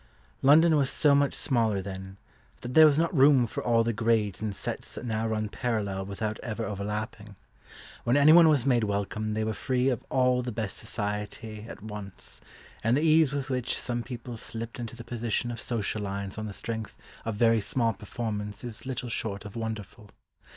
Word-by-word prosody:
London 155 +4 +6
was 140 -3 +3
so 150 -2 +4
much 140 0 +3
smaller 115 -6 +1
then, 95 0 -7 0.4
that 120 +1 -6
there 155 +2 +9
was 145 -1 +3
not 170 +2 +1
room 135 -2 +6
for 110 - -5
all 115 -1 +3
the 115 0 0
grades 110 -3 +1
and 105 -2 -2
sets - - -5
that - - -6
now 110 -1 -1
run 110 -1 -1
parallel 100 -4 -2
without 105 +2 -3
ever 115 -1 -4
overlapping. 105 +1 -5 0.7
When 120 +4 +3
anyone 160 +3 +8
was 140 -5 +3
made 125 -4 +3
welcome 105 +1 -2
they 110 - 0
were 110 0 -1
free 130 +3 0
of 125 -4 -2
all 125 -1 +3
the 125 0 -4
best 110 -3 -4
society 105 +1 -5
at - - -10
once, 105 -3 -9 0.4
and 115 +4 +3
the - - +1
ease 160 -3 +5
with 140 -1 -3
which 125 -1 -1
some 120 -1 -2
people 120 -1 -7
slipped 115 +2 -6
into 120 -1 -5
the 120 - -9
position 120 0 -2
of 120 - -5
social 110 -2 -2
lions 100 0 -4
on 110 - -4
the - - -5
strength 110 +1 -5 0.3
of 115 -2 -3
very 115 0 +4
small 115 +2 +1
performance 105 -1 -5
is 120 +1 -7
little 130 -1 -3
short 105 -3 -3
of 105 - -9
wonderful. 110 -2 -6
115 Hz, 190 wpm, -28 LUFS, 105-125 Hz, 0.7 s, there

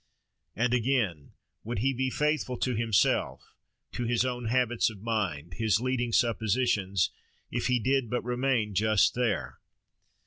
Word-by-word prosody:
And 125 +2 +1
again, 115 - 0 0.3
would 115 +2 -4
he 135 +7 +1
be 130 +1 -1
faithful 150 -3 -1
to 130 - -1
himself, 110 -3 0 0.4
to 120 - -3
his 120 +1 +1
own 125 -1 -3
habits 120 0 +1
of 105 -2 -12
mind, 90 -9 -2
his 110 -3 +2
leading 125 -1 -1
suppositions, 110 -5 +1 0.4
if 120 - -1
he 125 -1 +3
did 130 0 +1
but 125 - -1
remain 120 -3 0
just 110 +1 +3
there? 125 -2 -2
120 Hz, 140 wpm, -28 LUFS, 110-125 Hz, 0.4 s, he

